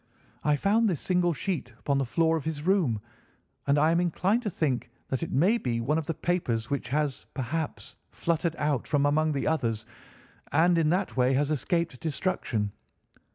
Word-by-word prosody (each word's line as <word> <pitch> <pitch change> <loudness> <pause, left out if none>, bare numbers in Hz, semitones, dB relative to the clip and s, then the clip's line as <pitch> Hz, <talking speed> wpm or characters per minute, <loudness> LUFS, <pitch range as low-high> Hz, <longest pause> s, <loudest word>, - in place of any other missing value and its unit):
I 150 -1 +3
found 215 +8 +3
this 170 -7 -1
single 180 -1 +2
sheet 150 - -3
upon 140 +2 0
the 135 - -1
floor 160 +7 +2
of 160 - -2
his 155 -2 -3
room, 170 - +2 0.7
and 140 +1 +4
I 155 +2 +4
am 170 - +3
inclined 185 +6 +1
to 220 - -2
think 135 -9 -1 0.2
that 130 - -1
it 165 - -3
may 195 - +3
be 120 - -1
one 150 +7 +1
of 155 - -6
the 165 - 0
papers 145 -9 -1
which 135 -4 -2
has, 145 -1 -1
perhaps, 145 +4 -4
fluttered 165 0 -1
out 145 -5 0
from 145 -2 +2
among 155 +2 +2
the 140 - -1
others, 115 -8 0 0.7
and 170 +3 +4
in 155 -2 +3
that 185 +3 0
way 125 +1 +4
has 145 +3 +1
escaped 170 -2 -1
destruction. 145 - -1
155 Hz, 185 wpm, -28 LUFS, 135-170 Hz, 0.7 s, and